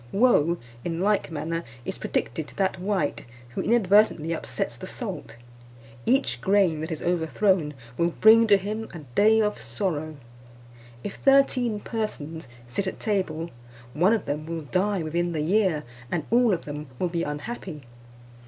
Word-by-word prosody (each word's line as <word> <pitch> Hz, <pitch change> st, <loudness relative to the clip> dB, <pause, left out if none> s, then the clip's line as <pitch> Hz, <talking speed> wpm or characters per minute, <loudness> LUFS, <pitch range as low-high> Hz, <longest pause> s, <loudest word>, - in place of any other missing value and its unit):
Woe, 185 Hz, -7 st, +4 dB, 0.3 s
in 165 Hz, -1 st, -2 dB
like 205 Hz, +2 st, +1 dB
manner, 165 Hz, +1 st, -3 dB, 0.2 s
is -, -, -4 dB
predicted 150 Hz, +6 st, -2 dB
to -, -, -13 dB
that 190 Hz, -2 st, 0 dB
wight 190 Hz, -5 st, -1 dB, 0.3 s
who 125 Hz, -, -3 dB
inadvertently 205 Hz, -7 st, +3 dB
upsets 165 Hz, -, -3 dB
the -, -, -8 dB
salt; 110 Hz, -, -6 dB, 0.7 s
each 265 Hz, +3 st, +2 dB
grain 190 Hz, -6 st, +3 dB
that 160 Hz, -, -4 dB
is 160 Hz, -, -4 dB
overthrown 170 Hz, -1 st, +1 dB, 0.2 s
will 170 Hz, 0 st, +3 dB
bring 225 Hz, +5 st, +6 dB
to 205 Hz, -2 st, +7 dB
him 215 Hz, +3 st, -4 dB
a 165 Hz, -, -7 dB
day 220 Hz, -, +5 dB
of 210 Hz, -1 st, +1 dB
sorrow. 155 Hz, -, -3 dB, 0.9 s
If 200 Hz, -, -5 dB
thirteen 255 Hz, -5 st, +3 dB
persons 165 Hz, -, -4 dB, 0.2 s
sit 190 Hz, +11 st, -2 dB
at -, -, -4 dB
table, 170 Hz, -6 st, -1 dB, 0.4 s
one 180 Hz, +8 st, +4 dB
of 220 Hz, -, 0 dB
them 150 Hz, +2 st, -3 dB
will 165 Hz, -1 st, -3 dB
die 185 Hz, +4 st, 0 dB
within 170 Hz, +2 st, -1 dB
the 155 Hz, -, -1 dB
year; 180 Hz, -2 st, +2 dB, 0.3 s
and 160 Hz, -3 st, -1 dB
all 240 Hz, -1 st, +5 dB
of 175 Hz, -3 st, -1 dB
them 150 Hz, 0 st, -6 dB
will 180 Hz, -, 0 dB
be 170 Hz, -1 st, -1 dB
unhappy. 150 Hz, -, -5 dB
180 Hz, 155 wpm, -26 LUFS, 155-210 Hz, 0.9 s, to